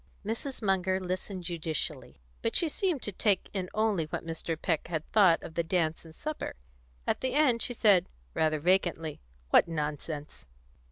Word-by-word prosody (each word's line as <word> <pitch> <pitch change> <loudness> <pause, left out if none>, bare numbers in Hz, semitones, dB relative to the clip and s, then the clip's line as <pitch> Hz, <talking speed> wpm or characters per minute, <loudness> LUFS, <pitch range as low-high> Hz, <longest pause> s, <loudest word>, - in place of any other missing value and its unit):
Mrs. 230 +4 -3
Munger 190 -1 +2
listened 185 0 -4
judicially, 155 - -2 0.2
but - - -1
she 335 - +4
seemed 335 - -1
to 210 - 0
take 200 -1 +1
in 185 -3 -2
only 215 -6 +1
what 155 - -5
Mr. 165 0 -3
Peck 165 -3 0
had 160 -2 -3
thought 190 -6 +5
of 160 - -8
the 170 - +1
dance 165 -2 0
and 160 -1 -13
supper; 310 - -4 0.5
at - - 0
the 260 0 -1
end 265 -6 +4
she 245 - -1
said, 200 -5 +4 0.2
rather 155 -1 +2
vacantly, 165 -2 +1 0.3
"What - - +6
nonsense!" 150 - -4
180 Hz, 165 wpm, -30 LUFS, 160-210 Hz, 0.5 s, What